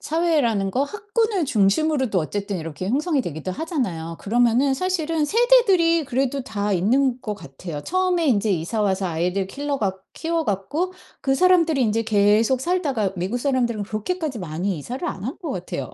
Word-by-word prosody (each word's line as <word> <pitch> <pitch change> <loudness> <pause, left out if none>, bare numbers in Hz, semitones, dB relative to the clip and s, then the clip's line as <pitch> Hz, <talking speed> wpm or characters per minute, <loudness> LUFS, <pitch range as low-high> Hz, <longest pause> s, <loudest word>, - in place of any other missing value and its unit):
사회라는 290 - +1
거 265 +7 +1
학군을 420 - -1
중심으로도 245 +2 +2
어쨌든 200 +4 -3
이렇게 165 +3 -5
형성이 290 +2 +1
되기도 160 +2 -5
하잖아요. 185 - -3
그러면은 240 +5 +2
사실은 330 -1 0
세대들이 390 -6 +4
그래도 270 +1 -1
다 205 -3 -2
있는 250 +7 +2
것 210 -3 -4
같아요. 160 -3 -8
처음에 365 - 0
인제 215 -5 +2
이사와서 190 +2 0
아이들 180 +3 -1
킬러 285 +4 -3
갖 190 -3 -1 0.2
키워 330 -1 -2
갖고 290 - -2 0.3
그 270 - +1
사람들이 335 -3 +4
인제 225 0 +1
계속 215 +4 +3
살다가 280 - 0
미국 190 +7 -2
사람들은 240 -5 0
그렇게까지 260 - -3
많이 180 +1 -3
이사를 255 - -5
안 195 - -6
한 270 +8 -4
것 320 - -3
같아요. 175 - -5
245 Hz, 390 characters per minute, -23 LUFS, 195-320 Hz, 0.3 s, 세대들이